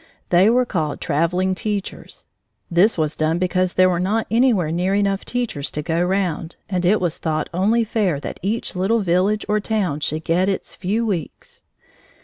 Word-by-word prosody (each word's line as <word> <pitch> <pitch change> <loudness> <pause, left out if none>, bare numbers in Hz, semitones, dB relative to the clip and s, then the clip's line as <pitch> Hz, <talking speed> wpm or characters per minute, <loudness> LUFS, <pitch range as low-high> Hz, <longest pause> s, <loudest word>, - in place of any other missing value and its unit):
They 180 +4 +5
were 250 +2 +3
called 160 -10 -2
traveling 180 +5 0
teachers. 205 0 -5 0.5
This 180 +6 +4
was 155 -2 0
done 160 +1 0
because 185 0 0
there 185 0 +5
were 175 -2 +1
not 210 +5 0
anywhere 225 -9 +3
near 180 +4 0
enough 200 -1 0
teachers 235 - -3
to 150 - -3
go 165 +2 0
round, 180 -3 -1
and 180 -2 0
it 210 +3 +4
was 175 -3 -2
thought 155 -2 -2
only 215 +6 +2
fair 205 -9 0
that - - -7
each 210 +2 -2
little 205 +5 +1
village 190 +3 +1
or 210 0 +1
town 200 -8 -1
should 155 +1 -2
get 180 +4 +1
its 195 - -3
few 210 +5 -1
weeks. 180 - -5
185 Hz, 175 wpm, -21 LUFS, 170-210 Hz, 0.5 s, They